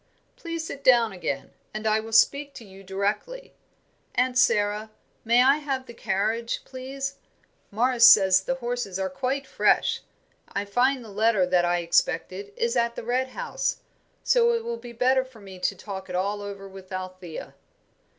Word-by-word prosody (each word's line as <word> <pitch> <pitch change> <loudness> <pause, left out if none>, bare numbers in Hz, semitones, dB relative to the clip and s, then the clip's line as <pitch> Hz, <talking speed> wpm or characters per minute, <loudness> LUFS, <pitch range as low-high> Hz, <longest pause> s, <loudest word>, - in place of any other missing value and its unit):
"Please 335 -1 -5
sit 280 -3 -8
down 235 -3 +5
again, 160 -7 -4 0.2
and 215 +1 -5
I 215 0 +3
will 220 +1 -8
speak 280 +5 +3
to 230 - -10
you 195 0 -14
directly. 205 - -3 0.6
Aunt 250 0 +1
Sara, 215 -3 +2 0.3
may 235 +2 +4
I 275 +3 +5
have 270 -3 -3
the 235 - -11
carriage, 220 +3 -2
please. 270 +1 -6 0.5
Morris 235 +2 +5
says 190 -2 +6
the 265 +7 -2
horses 240 -6 -3
are 190 0 -2
quite 275 0 -2
fresh. - - +2 0.5
I 200 +1 -2
find 245 +4 +1
the - - -11
letter 210 -1 +2
that 180 -1 +2
I 175 0 +1
expected 185 +3 0
is 235 +1 0
at 235 -1 +1
the - - -6
Red 250 +3 0
House, 480 - -3 0.4
so 475 -1 +4
it 460 - -2
will 470 0 -3
be 240 - -10
better 255 +2 +2
for 260 -3 -16
me 190 -2 -11
to 180 - 0
talk 190 -2 -8
it 180 - -4
all 200 +3 -1
over 200 -1 -7
with 190 -1 -13
Althea." 185 -3 -7
230 Hz, 170 wpm, -25 LUFS, 195-260 Hz, 0.6 s, says